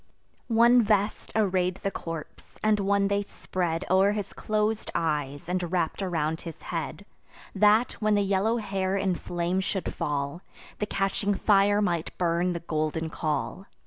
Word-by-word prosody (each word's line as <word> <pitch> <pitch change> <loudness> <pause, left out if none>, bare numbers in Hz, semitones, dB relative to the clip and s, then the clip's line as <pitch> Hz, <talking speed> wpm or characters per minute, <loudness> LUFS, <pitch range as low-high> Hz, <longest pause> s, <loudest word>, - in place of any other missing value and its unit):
One 235 +1 +6
vest 205 -1 0
array'd 185 -4 +2
the 195 - 0
corpse; 165 -4 -8
and 215 -1 +3
one 200 0 +2
they 200 0 +1
spread 175 -4 -3
O'er 190 +2 +4
his 210 -2 -4
clos'd 215 0 -1
eyes, 145 -3 -1
and 180 -1 -2
wrapp'd 175 0 0
around 160 -4 -1
his 165 -2 -8
head, 170 +4 -5 0.5
That, 210 +4 +4
when 215 -1 +3
the 205 - +3
yellow 200 +4 +1
hair 195 -3 -1
in 195 -1 +1
flame 175 +1 -2
should 190 0 -2
fall, 145 +3 -2 0.4
The 210 - -1
catching 195 +1 0
fire 205 +1 +4
might 170 -4 -2
burn 175 0 +1
the 170 - -4
golden 160 0 -2
caul. 150 +4 -3
190 Hz, 150 wpm, -27 LUFS, 165-205 Hz, 0.5 s, One